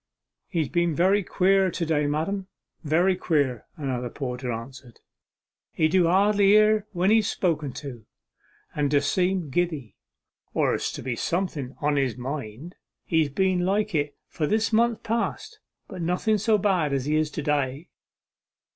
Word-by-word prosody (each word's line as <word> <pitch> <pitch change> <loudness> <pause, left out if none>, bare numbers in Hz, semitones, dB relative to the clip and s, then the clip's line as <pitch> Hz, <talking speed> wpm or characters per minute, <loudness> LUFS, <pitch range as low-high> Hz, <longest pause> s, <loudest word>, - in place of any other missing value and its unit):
'He's 165 -6 -1
been 170 -2 +1
very 190 +5 +3
queer 190 +1 +2
to 170 0 -3
day, 150 -2 +1
madam, 185 +7 -2 0.4
very 170 +5 +2
queer,' 140 -10 0
another 130 -4 -3
porter 125 -1 -4
answered. 120 +1 -8 0.7
'He 155 - +2
do 180 0 +3
hardly 200 +3 +3
hear 215 +1 +4
when 185 +1 +1
he's 220 -2 +3
spoken 155 -6 -1
to, 125 -7 -9 0.7
and 145 -1 0
d' 145 0 +4
seem 180 0 0
giddy, 155 - -2 0.6
or - - +2
as - - -3
if 125 -3 -4
something 170 -6 -2
was 130 - -16
on 145 0 +1
his 130 -3 0
mind. 135 +3 -6 0.3
He's 160 -4 +1
been 185 +5 +1
like 205 +3 0
it 145 -2 -1
for 150 - -2
this 220 +4 0
month 230 0 +2
past, 230 +1 -3 0.3
but 185 - -7
nothing 180 +6 +1
so 220 +1 +3
bad 185 -8 +1
as 135 -2 -1
he 150 +1 +1
is 155 0 +1
to 150 - -5
day. 145 +1 -1
165 Hz, 155 wpm, -25 LUFS, 140-190 Hz, 0.7 s, hear